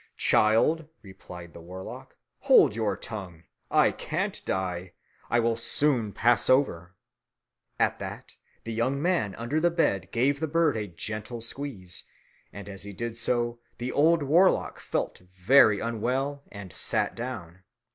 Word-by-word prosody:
"Child," 145 +9 +3 0.2
replied 90 -3 -11
the 85 - -11
warlock, 90 +3 -9 0.2
"hold - - +5
your 105 -4 -1
tongue. 95 -8 -8 0.3
I - - +4
can't - - -3
die. 90 -1 -3 0.4
It 120 - +4
will 115 0 +2
soon 120 -2 +1
pass 120 +3 +2
over." 95 -10 +2 0.8
At - - +1
that - - -8 0.3
the 115 - -5
young 125 +5 0
man 150 - 0
under 120 +7 -1
the 175 +2 +3
bed 100 - 0
gave 135 +4 +1
the 160 - -1
bird 160 -2 +2
a 105 -2 -3
gentle 110 +7 -5
squeeze; 115 -7 -6 0.5
and 100 0 -9
as 100 -1 -8
he 100 0 -7
did 115 +2 -4
so, 120 0 -1 0.2
the 125 +1 -3
old 160 +1 +3
warlock 170 +7 +3
felt - - -3 0.2
very 110 +1 +5
unwell 130 +5 -2
and 100 -4 -9
sat - - 0
down. 100 -8 -7
115 Hz, 145 wpm, -27 LUFS, 95-135 Hz, 0.8 s, hold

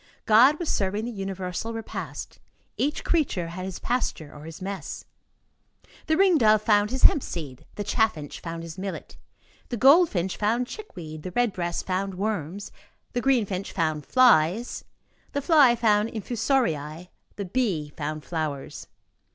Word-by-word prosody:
God 250 +7 +6
was 345 - -4
serving 205 0 0
the 240 - -4
universal 195 +1 -4
repast. 225 -1 -6 0.4
Each 295 +3 -1
creature 255 - 0
had 185 +2 -6
his 190 -2 -5
pasture 230 -11 -2
or 150 +1 -11
his 165 0 -9
mess. 190 -4 -6 1.0
The 315 0 +2
ring 375 -4 +5
dove 215 -2 +4
found 210 -1 +3
his 260 +1 -4
hemp 295 - +7
seed, 145 - -7
the 205 - -3
chaffinch 205 - -1
found 165 0 -6
his 165 +2 -8
millet, 195 0 -6 0.5
the 240 - -3
goldfinch 260 - +4
found 230 +4 +1
chickweed, 175 - -9
the 185 - -5
red 235 +3 +1
breast 175 -1 -3
found 190 +1 -2
worms, 200 -1 -3 0.4
the 245 - 0
green 260 -5 +3
finch 195 0 -4
found 155 -2 -1
flies, 235 -3 +3 0.5
the 285 - 0
fly 285 -5 +6
found 215 -2 +2
infusoriæ, 195 - -1 0.3
the 200 - -4
bee 180 -9 -1
found 155 0 -4
flowers. 155 -5 -4
200 Hz, 150 wpm, -26 LUFS, 170-245 Hz, 1.0 s, hemp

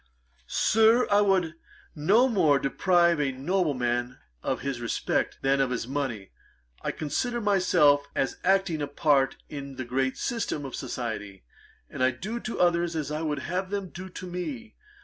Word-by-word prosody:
'Sir, 225 +3 +4
I 205 +1 +5
would 190 -5 +2 0.4
no 200 - +4
more 160 - +3
deprive 170 +3 +2
a 140 -2 +1
nobleman 130 -5 -1 0.2
of - - -2
his 135 -2 -3
respect, 120 - -1
than 135 0 +3
of 135 - +1
his 120 -2 -3
money. 130 -8 -3 0.5
I - - -2
consider 240 - -2
myself 180 -9 +3
as 135 - -1
acting 190 -4 +2
a 145 - -1
part 140 -2 +2
in 140 -2 -7
the 130 - -5
great 130 +2 -1
system 225 -11 -2
of 135 - -7
society, 105 -5 -5 0.4
and - - -7
I 130 - +5
do 195 - -5
to 230 - -5
others 170 -1 +2
as 150 -2 -3
I 155 +1 -2
would 150 -3 -2
have 185 +2 -2
them 200 -2 -4
to 185 +2 -8
do - - -9
to 185 - -8
me. 215 +6 -6
150 Hz, 170 wpm, -27 LUFS, 135-190 Hz, 0.5 s, I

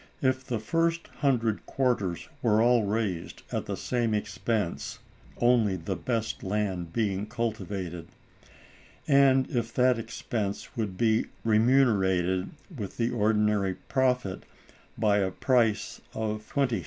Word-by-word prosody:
If 130 0 +2
the 125 -2 -2
first 165 +9 0
hundred 120 -7 +1
quarters 115 -10 0
were 110 -2 +3
all 120 -1 +4
raised 100 -5 -2
at - - -2
the - - -3
same 120 -3 0
expense 105 -2 -2 0.4
(only 120 -5 +3
the 90 +2 -3
best 110 +5 -2
land 95 -4 -2
being 100 -1 -1
cultivated), 95 -7 -4 1.0
and 135 -2 +5
if 120 -2 -1
that 125 -1 +4
expense 110 -3 -4
would 105 -5 -3
be 110 -1 +2 0.2
remunerated 105 -6 +3 0.3
with 105 -7 -6
the 115 +1 +1
ordinary 105 -3 +2
profit 125 -7 0 0.6
by 105 -2 +3
a 95 -1 +1
price 115 0 +1
of 110 -1 -3
20_s. 135 -5 +1
110 Hz, 120 wpm, -28 LUFS, 100-120 Hz, 1.0 s, and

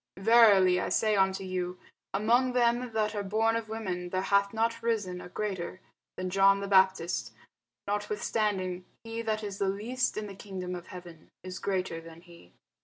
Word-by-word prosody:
Verily 195 -4 +6
I - - -2
say 215 -1 +2
unto 190 0 +2
you, 180 -1 -3 0.3
Among 240 +5 +2
them 240 0 +2
that 215 -1 0
are 205 - -2
born 220 +3 +1
of 230 -1 -3
women 185 -5 -4
there 185 +1 -1
hath 200 0 +2
not 230 +1 0
risen 210 -6 -1
a - - -10
greater 185 -2 -4 0.4
than 185 0 -3
John 195 +1 +5
the 200 - -4
Baptist: 190 - +2 0.5
notwithstanding 205 -3 -1 0.2
he 230 0 -5
that 220 -1 -2
is 200 -1 -6
least 210 +7 -1
in 215 - -2
the 200 - -8
kingdom 185 -2 -6
of 175 -1 -7
heaven 175 -3 -11
is 185 0 -6
greater 185 -4 -2
than 165 0 -13
he. 170 - -17
195 Hz, 170 wpm, -29 LUFS, 185-220 Hz, 0.5 s, Verily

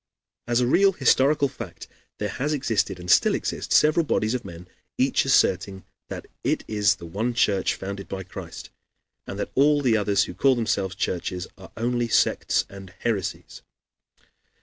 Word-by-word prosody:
As 120 0 +2
a - - +3
real 195 +10 +4
historical 140 -1 +3
fact - - -9 0.3
there 105 - -2
has 145 +9 -2
existed, 115 -10 -1
and 90 - -9
still 90 - +4
exist, - - -4
several 155 +2 +4
bodies 110 -6 0
of 125 -1 -2
men, 90 -1 -10 0.3
each 130 +1 +2
asserting 95 -7 +2 0.3
that - - -6 0.2
it - - 0
is 105 -2 +2
the 85 - -11
one 110 +8 -2
Church, 100 -5 +2
founded 100 +1 -6
by 95 -1 -5
Christ, 90 - -9 0.6
and - - -6
that - - -4
all 145 +2 +4
the 125 -5 +2
others 100 -2 +2
who - - -6
call 135 -2 +3
themselves 100 -5 -1
churches 90 0 -3
are 95 - -14
only 120 +1 0
sects - - +2
and 95 -1 -11
heresies. 105 -7 -3
110 Hz, 165 wpm, -24 LUFS, 95-130 Hz, 0.6 s, real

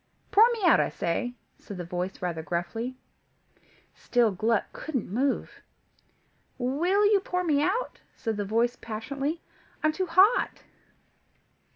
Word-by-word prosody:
"Pour 420 - +7
me 450 -4 -5
out, 340 - +6
I - - +2
say," 245 +9 -2 0.2
said 200 - -9
the 175 - -4
voice 180 +2 -4
rather 170 -3 -2
gruffly. 200 +10 -3 1.0
Still 240 -3 +2
Gluck 215 +3 +1
couldn't 265 -11 -4
move. 265 +4 -1 1.0
"Will 335 +11 +2
you 410 -1 +5
pour 360 -1 -2
me 295 -4 +2
out?" 390 +11 -1 0.2
said 225 -2 -3
the 205 - -2
voice 230 +4 +1
passionately. 275 +8 -4 0.4
"I'm 310 - +4
too 370 +4 -2
hot." 380 +8 +3
255 Hz, 135 wpm, -27 LUFS, 215-345 Hz, 1.0 s, Pour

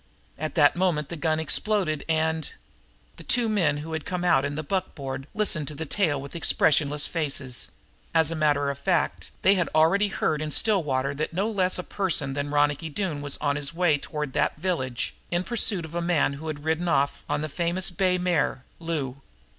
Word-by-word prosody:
At 155 +1 -4
that 145 -4 +5
moment 170 -5 0
the 170 - -4
gun 155 0 0
exploded 160 -1 +2
and 160 -1 0 0.7
The - - -10
two 240 -1 +2
men 175 -9 +2
who 160 - -6
had 160 -1 -3
come 180 -1 -3
out 135 -7 +4
in 140 0 -3
the 155 - -3
buckboard 140 -6 -4
listened 170 -9 0
to 150 - -6
the 160 +3 -4
tale 155 -3 0
with 140 +4 -9
expressionless 150 -3 +3
faces. 140 -6 -3 0.4
As 160 -1 +4
a - - -2
matter 145 -2 +2
of 140 - -8
fact 170 +2 0
they 190 - +6
had 180 -4 +1
already 190 +7 +4
heard 155 -6 -1
in 155 - -2
Stillwater 145 -8 +1
that 155 +3 -3
no 200 +6 0
less 185 -3 +2
a 180 - -4
person 170 -10 0
than 145 +1 -3
Ronicky 145 +2 +1
Doone 155 -3 -3
was 145 -1 -2
on 145 -1 0
his 145 +3 -1
way 170 -4 +3
toward 150 -2 -5
that - - 0
village 150 -8 -2 0.2
in 175 +1 0
pursuit 205 -5 +1
of 160 - -11
a 170 - -1
man 170 -5 +2
who 150 +3 -8
had 145 -2 -5
ridden 160 +2 0
off 140 -4 +1
on 150 - 0
the - - -1
famous 175 +4 -1
bay 180 +1 +1
mare, 175 -7 0 0.2
Lou. 145 -5 -3
155 Hz, 200 wpm, -26 LUFS, 145-180 Hz, 0.7 s, they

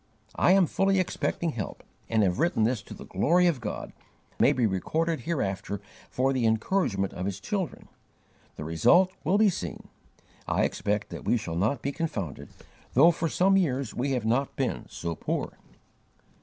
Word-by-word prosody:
I 180 - +4
am 195 -2 +5
fully 195 +3 +2
expecting 170 -2 -1
help, 110 -8 -6 0.3
and 110 -2 +3
have 90 -2 +1
written 170 -10 +2
this 115 -1 +1
to - - -11
the - - -10
glory 170 - +2
of 160 -8 +1
God, 105 - -5
that - - -33
it - - -4
may - - +6
be 125 -2 +1
recorded 160 - 0
hereafter 100 - -2 0.3
for 135 +2 +1
the 125 -3 +1
encouragement 110 - 0
of 90 +2 -3
His 100 -1 -4
children. 190 - -4 0.7
The - - -6
result 130 - +4
will 180 +7 +2
be 215 -1 +5
seen. 90 - -6 0.6
I - - +1
expect 105 0 -1
that - - -8
we 120 - +3
shall 105 -7 -5
not 110 +8 0
be 140 - -1
confounded, 110 - -4 0.5
though 160 +7 +7
for 165 0 -2
some 195 +4 +3
years 140 - 0
we 135 +2 -1
have 125 -4 -1
not 125 +5 0
been - - -2
so 85 0 -4
poor." - - -3
130 Hz, 180 wpm, -27 LUFS, 100-170 Hz, 0.7 s, though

